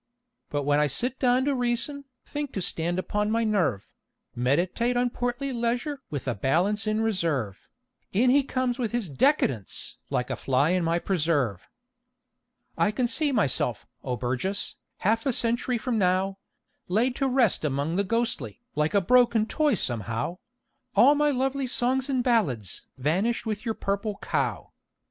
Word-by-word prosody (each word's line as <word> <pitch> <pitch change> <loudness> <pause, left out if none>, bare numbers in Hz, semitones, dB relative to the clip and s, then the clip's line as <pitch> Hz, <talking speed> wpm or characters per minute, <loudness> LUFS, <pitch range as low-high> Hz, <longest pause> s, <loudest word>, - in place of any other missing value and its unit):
But 145 -1 -1
when 145 +1 +2
I 150 - +3
sit 245 - -1
down 255 0 +3
to 285 - +2
reason, 255 +3 -1 0.2
think 290 -2 -5
to - - -2
stand 170 +2 0
upon 210 +3 -1
my 230 +1 +1
nerve, 195 - 0 0.5
Meditate 175 - +1
on 245 0 +1
portly 245 +3 -2
leisure 245 +4 -1
with 140 -4 -5
a 125 - +1
balance 180 - +1
in 215 +1 +1
reserve, 165 - -1 0.4
In 245 +5 +3
he 285 +2 +5
comes 255 -2 -1
with 235 -2 -2
his 240 -5 -1
"Decadence!" 135 - 0
like 125 - -1
a - - 0
fly 140 +4 +1
in 180 -1 +1
my 165 +1 +1
preserve. 150 - 0 1.1
I - - +2
can 230 +4 0
see 290 +4 +1
myself, 130 - 0 0.2
O 125 -2 -2
Burgess, 130 +12 -2 0.2
half 225 +5 +1
a - - +3
century 235 +2 +1
from 230 -1 -1
now, 190 +1 +1 0.5
Laid 235 +7 +1
to 275 - +1
rest 250 -9 +2
among 145 +3 -1
the 200 - +2
ghostly, 230 +3 -1
like 150 +5 0
a 200 - +5
broken 235 +1 +4
toy 300 +2 +1
somehow, 120 - -2 0.6
All 275 +4 +7
my 295 0 +2
lovely 270 0 0
songs 255 +2 0
and 260 -2 +1
ballads 150 - 0
vanished 185 - 0
with 215 -1 -3
your 225 -1 -1
"Purple 200 +1 -2
Cow." - - -2
215 Hz, 160 wpm, -26 LUFS, 155-250 Hz, 1.1 s, All